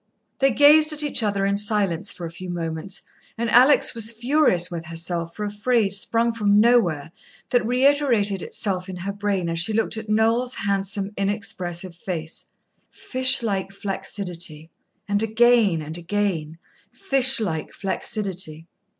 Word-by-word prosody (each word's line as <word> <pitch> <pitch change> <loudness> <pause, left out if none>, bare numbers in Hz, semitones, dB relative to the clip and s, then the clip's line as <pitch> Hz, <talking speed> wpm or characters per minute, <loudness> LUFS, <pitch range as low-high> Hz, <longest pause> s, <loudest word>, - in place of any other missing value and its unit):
They 270 - +4
gazed 300 +4 +6
at 300 0 -1
each 290 -4 0
other 200 -2 0
in 200 0 +1
silence 205 -3 +1
for 175 - -8
a 165 - -7
few 180 +2 -9
moments, 170 +1 -5 0.3
and 230 -1 -2
Alex 255 +2 +5
was 230 -1 0
furious 235 - +1
with 170 -1 -6
herself 170 0 -3
for 210 - -5
a 205 - -4
phrase 210 -2 +1
sprung 230 +3 0
from 205 -2 +2
nowhere 200 -11 +2 0.4
that 245 - +2
reiterated 250 -6 +2
itself 190 -2 -3
in 185 - -6
her 190 +3 -5
brain 200 -3 -2
as 165 0 -2
she 195 +6 +1
looked 225 0 0
at 220 -1 -7
Noel's 225 +4 +1
handsome, 200 0 -2
inexpressive 195 -3 -3
face 170 -3 -6 0.4
"Fish 255 -1 +2
like 195 -3 -2
flaccidity...." 180 -5 -4 0.4
And 205 0 0
again 225 -6 +3
and 155 +2 -6
again 170 -4 -2 0.3
"_Fish 270 -8 +3
like 165 -8 -3
flaccidity. 190 -5 -4
200 Hz, 150 wpm, -22 LUFS, 175-230 Hz, 0.4 s, gazed